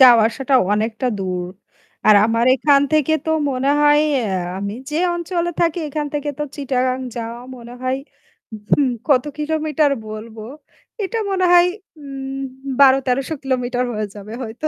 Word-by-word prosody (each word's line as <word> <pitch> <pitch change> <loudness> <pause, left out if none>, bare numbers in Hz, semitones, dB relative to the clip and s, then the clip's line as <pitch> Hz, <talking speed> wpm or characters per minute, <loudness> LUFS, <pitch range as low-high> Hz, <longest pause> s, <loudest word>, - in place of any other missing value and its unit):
যাওয়া 245 -3 +8
আসাটা 270 +3 -2 0.2
অনেকটা 220 +4 -1
দূর। 180 -2 -3 0.6
আর 215 - +8
আমার 230 +1 +1
এখান 280 +1 +4
থেকে 310 0 +3
তো 320 - -1 0.2
মনে 260 +1 -1
হয় 295 0 +5 0.2
অ্যা 220 -6 -2 0.3
আমি 200 +1 -3 0.2
যে 300 - -2 0.2
অঞ্চলে 345 0 -2
থাকি 340 0 +2
এখান 295 +1 -3
থেকে 295 0 -2
তো 295 - -1
চিটাগাং 260 -2 -1 0.2
যাওয়া 230 0 -5 0.2
মনে 235 0 -11
হয় 255 +1 0 0.8
হু - - +4 0.2
কত 260 -4 +4
কিলোমিটার 305 -1 +1 0.2
বলবো। 215 +1 -8 0.6
এটা 455 +4 -2
মনে 370 -1 +1
হয় 350 0 +7 0.3
উম 270 -1 -6 0.4
১২-১৩০০ 270 +1 +3
কিলোমিটার 250 -2 -1
হয়ে 215 0 -2
যাবে 205 +1 -9
হয়তো। 240 +6 -4
265 Hz, 145 wpm, -20 LUFS, 230-295 Hz, 0.8 s, যাওয়া